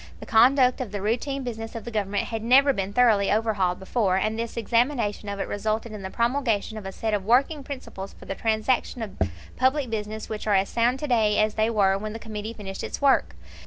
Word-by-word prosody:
The - - -9
conduct 250 +3 +4
of 235 -6 -5
the 205 - -3
routine 250 +7 -1
business 225 -2 -6
of 225 - -6
the 235 - -6
Government 205 -2 -1
had 225 -1 -3
never 270 +5 +5
been 195 -4 -3
thoroughly 215 -3 +4
overhauled 205 -4 +1
before, 190 -1 0
and 215 +3 0
this 230 0 -4
examination 230 -2 0
of 200 0 -4
it - - -2
resulted 215 +2 -2
in 210 -2 -7
the 190 - -5
promulgation 235 -2 0
of 210 -3 -6
a - - -5
set 220 +3 -3
of 205 -2 0
working 275 +7 +2
principles 255 -8 -7
for - - -15
the - - -3
transaction 225 +3 0
of 205 - -7 0.4
public 260 -1 +1
business 215 0 -4
which 215 0 -5
are 205 - +3
as 195 +1 +2
sound 240 +2 +1
to 300 - -2
day 220 -5 +2
as 215 0 +2
they 220 +1 +1
were 195 -3 +2
when 215 +1 -5
the - - -5
Committee 215 -1 -6
finished 195 -3 -7
its - - -5
work. 275 - +3
220 Hz, 225 wpm, -25 LUFS, 205-245 Hz, 0.4 s, never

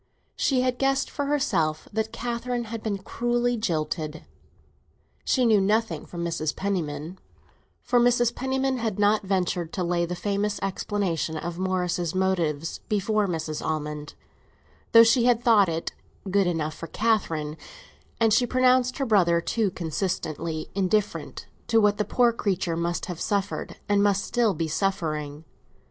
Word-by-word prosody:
She 260 -3 +2
had 255 -1 0
guessed 270 0 +1
for 285 - -2
herself 165 - 0
that 220 +1 -1
Catherine 240 0 -3
had 230 0 -6
been 210 -3 -2
cruelly 240 +5 -1
jilted—she 160 - -4
knew 215 -3 +5
nothing 205 -5 0
from 170 -1 -5
Mrs. 160 -2 -2
Penniman, 170 -3 -3 0.6
for 245 - +3
Mrs. 240 0 +3
Penniman 265 0 -1
had 225 -4 -2
not 210 +1 +3
ventured 180 -4 -1
to 185 - -1
lay 170 0 0
the 180 - -3
famous 205 +2 -1
explanation 185 -5 -2
of 170 +2 -5
Morris's 180 -2 -1
motives 170 -5 0
before 210 0 +1
Mrs. 160 -3 -3
Almond, 150 -1 -4 0.8
though 230 0 +9
she 235 +1 +4
had 240 -1 +3
thought 215 -6 +5
it 165 0 -3 0.4
good 200 -1 +3
enough 160 -3 -1
for 165 - -8
Catherine—and 215 - -2
she 245 +3 +3
pronounced 255 0 +3
her 275 - 0
brother 180 -7 +4
too 210 +4 0
consistently 165 -2 -3
indifferent 200 +2 -1 0.2
to 225 - +4
what 205 -1 +3
the 210 - +1
poor 240 -2 +3
creature 185 -6 -1
must 170 +1 -2
have 180 -4 -6
suffered 200 -1 -2
and 205 -1 +3
must 200 -1 +2
still 230 -5 +1
be 160 +1 -1
suffering. 155 -4 -2
195 Hz, 145 wpm, -26 LUFS, 165-230 Hz, 0.8 s, though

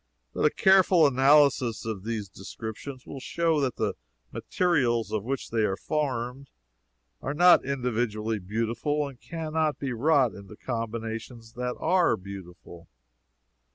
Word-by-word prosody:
But - - 0
a - - +6
careful 185 -2 +5
analysis 135 -4 +4
of 110 -4 -4
these 110 -2 -3
descriptions 110 +7 -8
will 135 - -8
show 165 +3 0
that 135 -4 -1
the - - -1 0.4
materials 120 - 0
of 110 -2 -1
which 135 +3 -4
they 115 -1 +1
are 95 -2 0
formed 135 -3 -3 0.7
are 145 - -3
not 175 +3 +6
individually 115 -5 -2
beautiful 115 +9 -2
and 130 -3 -12
can 160 -2 -6
not 155 -3 +1
be 135 -3 -3
wrought 135 0 +3
into 100 +1 -11
combinations 115 0 -5
that 125 0 -3
are 175 -7 +2
beautiful. 90 -3 -11
125 Hz, 135 wpm, -27 LUFS, 110-145 Hz, 0.7 s, a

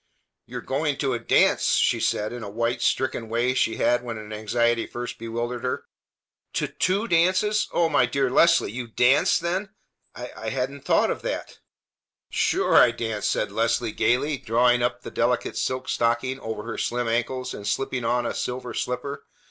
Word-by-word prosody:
"You - - -7
are - - -5
going 145 +1 -1
to 135 -3 0
a 120 - -2
dance!" 115 - +3
she - - +2
said 105 +2 0
in 120 - -6
a 105 - -6
white, 115 +3 -1
stricken 120 -4 0
way 120 +3 +1
she 115 -3 +1
had 120 0 +2
when 120 -2 -6
an 110 0 -8
anxiety 115 +2 0
first 120 +1 -6
bewildered 120 +1 -4
her. 125 - -2 0.7
"To - - 0
two 200 +5 0
dances! 185 +5 +2
O 170 - +2
my 125 - +3
dear 135 +1 0
Leslie! 170 -5 +4
You 120 +1 -5
dance, 125 +4 +3
then? 185 +4 -2 0.5
I 125 -2 -6
hadn't 130 +2 -3
thought - - +3
of - - -4
that!" - - -5 0.7
"Sure - - +1
I - - +8
dance!" 115 -3 -3
said - - 0
Leslie 115 0 0
gayly, 135 +6 +1
drawing 120 +2 +2
up 120 0 -1
the - - -7
delicate - - 0
silk 130 0 -2
stocking 120 +3 0
over 110 -3 -5
her 115 0 -5
slim 120 0 -1
ankles 125 +2 -1
and 100 - -7
slipping 130 +3 -1
on 120 +1 +1
a - - -2
silver 125 0 -4
slipper. 125 +3 -4
120 Hz, 180 wpm, -24 LUFS, 115-130 Hz, 0.7 s, I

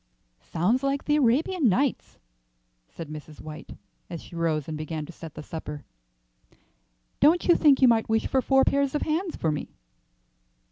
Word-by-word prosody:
"Sounds 180 - 0
like 275 0 -1
the 295 - +2
Arabian 290 +3 +2
Nights," 260 +7 -1 0.7
said 165 - -8
Mrs. 150 0 -10
White, 155 0 -10 0.3
as 170 -3 -7
she - - -13
rose 160 -3 -1
and 160 - -4
began 155 0 -5
to 175 - -10
set 165 -2 -11
the 150 - -8
supper. 150 -2 -7 1.3
"Don't 335 +3 +4
you 345 - +6
think 285 -4 +4
you - - +8
might 225 -2 +2
wish 225 0 +1
for 265 - +1
four 270 +1 +3
pairs 280 0 +1
of 295 - 0
hands 330 +3 -2
for 160 - -1
me?" 150 - -6
225 Hz, 170 wpm, -26 LUFS, -, 1.3 s, you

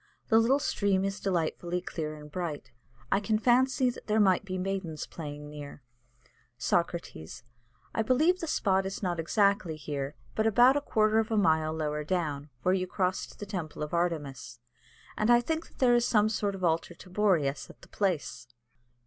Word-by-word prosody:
The 225 - +6
little 245 +5 +4
stream 200 -8 +1
is 195 0 -3
delightfully 175 -1 -1
clear 155 -4 -5
and 150 0 -12
bright; 150 -7 -4 0.4
I 195 - +4
can 215 +1 +1
fancy 255 +3 +3
that - - -13
there 215 0 +2
might 190 -3 +4
be 185 -2 -4
maidens 185 -4 -3
playing 150 -2 -8
near. 145 -2 -9 0.7
"Socrates. 145 - -2 0.5
I - - +1
believe 305 +11 +3
the 330 - -4
spot 190 -8 +1
is 195 - -6
not 175 -2 -1
exactly 200 -1 +2
here, 145 -1 -4 0.2
but 220 - +1
about 245 +5 +6
a 290 - +1
quarter 215 -5 +2
of 220 - 0
a 220 - 0
mile 160 -6 +3
lower 150 -1 -2
down, 150 -4 -2
where 185 - +3
you 185 -1 0
cross 185 0 -1
to - - -15
the 205 - -6
temple 170 -7 -5
of 150 - -6
Artemis, 145 -9 -2 0.6
and 215 - +2
I 240 0 +7
think 320 +7 -2
that - - -24
there 250 -2 +4
is 240 0 +3
some 215 -1 +3
sort 205 -2 -1
of 190 - -8
an 175 - +5
altar 165 +1 -2
of 180 - -15
Boreas 165 -10 +1
at - - -16
the - - -13
place. 175 -10 -2
185 Hz, 190 wpm, -29 LUFS, 155-215 Hz, 0.7 s, I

